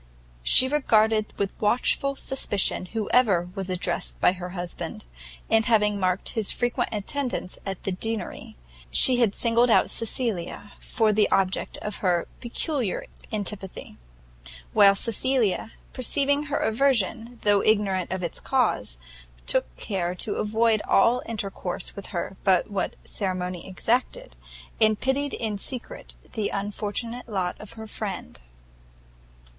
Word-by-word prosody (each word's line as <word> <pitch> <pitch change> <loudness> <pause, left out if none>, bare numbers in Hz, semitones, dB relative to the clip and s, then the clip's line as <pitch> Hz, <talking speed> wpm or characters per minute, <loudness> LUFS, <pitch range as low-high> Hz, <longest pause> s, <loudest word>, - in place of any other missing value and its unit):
She 255 - +6
regarded 220 -6 +2
with 200 -1 -1
watchful 250 +5 +2
suspicion 205 -9 +2
whoever 210 -4 +2
was 195 -1 -5
addressed 180 -1 -2
by - - +5
her 180 -1 -6
husband, 175 - -6 0.4
and 225 0 +3
having 210 -3 +3
marked 185 0 0
his 220 -3 -2
frequent 245 0 -1
attendance 230 -1 -3
at 195 -2 -4
the 195 - -2
Deanery, 225 +4 -3 0.3
she 255 -2 +7
had 225 -5 +2
singled 235 +1 +3
out - - +4
Cecilia 220 -4 -3
for 220 -3 +1
the 210 0 +3
object 190 -1 0
of 210 -1 -4
her 175 -3 +1
peculiar 245 - -2 0.3
antipathy; 205 -3 -3 0.8
while 200 0 +7
Cecilia, 230 -1 0 0.2
perceiving 285 +3 +1
her 290 0 -1
aversion 235 -1 +1
though 205 -1 +4
ignorant 200 -4 +1
of 185 -1 -3
its 170 - -2
cause, - - 0 0.5
took - - 0
care 180 - -2
to 205 +3 -2
avoid 220 +1 +2
all 235 +5 +4
intercourse 195 -5 -3
with 200 - -8
her 190 +1 -4
but 190 0 +3
what 200 - -2
ceremony 185 -3 -3
exacted, 250 - -1 0.5
and 215 -1 +4
pitied 275 +2 0
in 215 -3 -3
secret 260 - -6 0.2
the 215 -3 -2
unfortunate 210 +4 -4
lot 185 -4 -1
of 210 - -10
her 220 -1 -8
friend. 210 -3 -6
210 Hz, 130 wpm, -25 LUFS, 190-235 Hz, 0.8 s, she